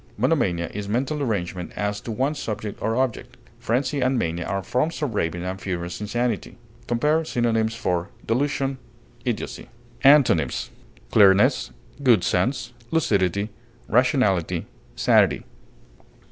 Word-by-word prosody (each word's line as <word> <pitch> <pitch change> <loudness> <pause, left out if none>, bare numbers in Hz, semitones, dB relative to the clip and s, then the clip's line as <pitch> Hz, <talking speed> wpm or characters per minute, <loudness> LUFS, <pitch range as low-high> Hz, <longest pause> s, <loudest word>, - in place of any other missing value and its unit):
Monomania 85 -1 +1
is 100 0 -5
mental 135 +7 -1
derangement 95 -9 -2
as 105 0 -2
to 115 - -6
one 130 +7 0
subject 110 -7 -5
or 115 - 0
object. 130 -2 -2 0.2
Frenzy 135 +5 0
and 130 +1 +2
mania 85 -4 -1
are 100 -1 -2
forms 140 - -1
of 135 -6 -1
raving 85 -3 -1
and 95 +1 -4
furious 90 -1 -4
insanity. 120 +2 -2 0.3
Compare 150 +7 +2
synonyms 115 -5 0
for 90 -4 -1 0.2
DELUSION; 135 +2 0 0.5
IDIOCY. - - -3 0.4
Antonyms: 135 - +4 0.4
clearness, 105 +6 +5 0.3
good 120 -9 +4
sense, 120 +7 0 0.2
lucidity, 100 - +1 0.4
rationality, 100 - +2 0.3
sanity. - - +3
110 Hz, 120 wpm, -24 LUFS, 95-130 Hz, 0.5 s, clearness